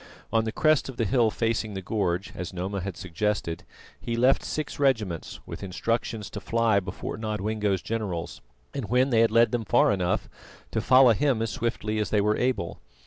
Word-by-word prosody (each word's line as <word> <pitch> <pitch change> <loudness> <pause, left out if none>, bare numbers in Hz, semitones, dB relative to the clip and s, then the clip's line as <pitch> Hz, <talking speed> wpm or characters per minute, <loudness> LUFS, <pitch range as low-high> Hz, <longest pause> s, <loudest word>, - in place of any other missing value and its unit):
On 115 0 +3
the 110 - -1
crest 155 +1 +2
of 130 - -8
the 115 - +1
hill 115 +1 +3
facing 110 -2 -1
the 95 - -4
gorge, 95 -3 -1
as 90 -1 -5
Noma 95 +2 -3
had 95 -1 -5
suggested, 95 -1 -2 0.3
he 115 - -3
left 125 +3 +3
six 155 -2 -4
regiments 110 - 0
with - - -8
instructions 105 +3 -2
to 105 - -5
fly 115 0 +2
before 95 - -6
Nodwengo's 105 -2 -1
generals, 100 -7 -4 0.3
and 135 -7 -4
when 130 +3 +3
they 115 - +4
had 115 0 +5
led 115 +1 +4
them 120 -2 -1
far 105 - +4
enough, 90 -3 0 0.4
to 110 - 0
follow 130 +1 +6
him 135 0 +1
as 115 0 -1
swiftly 110 -2 -2
as 105 - -1
they 105 - +2
were 105 +1 +2
able. 125 -9 -1
110 Hz, 190 wpm, -26 LUFS, 100-115 Hz, 0.4 s, follow